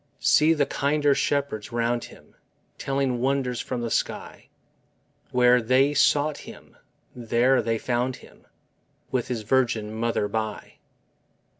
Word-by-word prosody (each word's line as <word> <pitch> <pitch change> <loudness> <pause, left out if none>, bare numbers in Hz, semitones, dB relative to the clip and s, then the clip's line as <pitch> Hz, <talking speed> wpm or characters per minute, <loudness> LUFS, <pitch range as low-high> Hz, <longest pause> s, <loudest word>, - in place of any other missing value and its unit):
See 160 +2 +4
the 145 -2 +2
kinder 145 +1 +1
shepherds 140 -7 -2
round 120 0 -1
Him, - - -17 0.5
Telling 135 -2 -1
wonders 130 -2 0
from 125 -2 -4
the 115 -1 -4
sky! - - -3 0.8
Where 125 0 +4
they 130 +5 +3
sought 145 +1 +2
Him, - - -13 0.4
there 120 +2 +2
they 115 0 -1
found 125 +2 -1
Him, - - -18 0.6
With 125 -2 -1
His 115 -3 -4
Virgin 115 -3 0
mother 115 -2 -1
by. 110 0 -5
125 Hz, 125 wpm, -25 LUFS, 115-135 Hz, 0.8 s, See